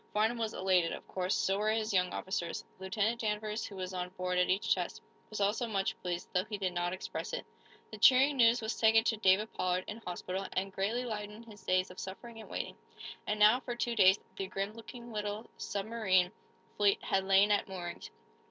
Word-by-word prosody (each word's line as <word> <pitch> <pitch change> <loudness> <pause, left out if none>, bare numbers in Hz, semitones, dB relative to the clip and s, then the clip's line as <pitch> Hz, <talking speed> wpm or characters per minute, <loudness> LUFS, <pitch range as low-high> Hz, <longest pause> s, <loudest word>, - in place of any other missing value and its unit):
Farnum 220 +3 +2
was 225 -1 -2
elated, 185 -3 +2
of - - -8
course. 185 0 -1
So 195 +1 +1
were 215 +1 +1
his 220 -1 0
young 180 -1 +2
officers. 175 -3 -3
Lieutenant 210 +5 -1
Danvers, 215 0 -2
who 200 - -10
was 185 0 -5
on 180 -1 -3
board 180 0 -1
at 180 - +2
each 190 +3 +3
test, - - -3 0.3
was 215 - -5
also 210 +4 +1
much 195 -3 -1
pleased, 175 -1 -3
though 180 -1 +2
he 215 -1 -4
did 190 -2 -1
not 175 0 -1
express 185 - -5
it. - - -3 0.5
The 215 - -8
cheering 265 +5 +6
news 235 0 +5
was 220 +1 -2
taken 225 0 +5
to 225 -1 +1
David 205 +1 +3
Pollard, 185 0 0
in 210 - -6
hospital, 185 -2 -4
and 190 +1 -2
greatly 220 +7 -1
lightened 210 0 -5
his 210 -3 -14
days 185 0 +1
of 180 - -11
suffering 225 +4 -8
and - - -13
waiting. - - -4 0.5
And 210 0 -1
now, 215 +4 +7
for 245 -2 -5
two 240 0 -1
days, 190 -2 +6 0.2
the 195 - -3
grim 195 +2 -3
looking 235 +1 -10
little 210 +1 -4
submarine 195 -3 +1 0.5
fleet 205 -1 +3
had 190 0 +1
lain 195 +2 +5
at 205 - +2
moorings. 180 - -6
205 Hz, 205 wpm, -32 LUFS, 185-225 Hz, 0.5 s, now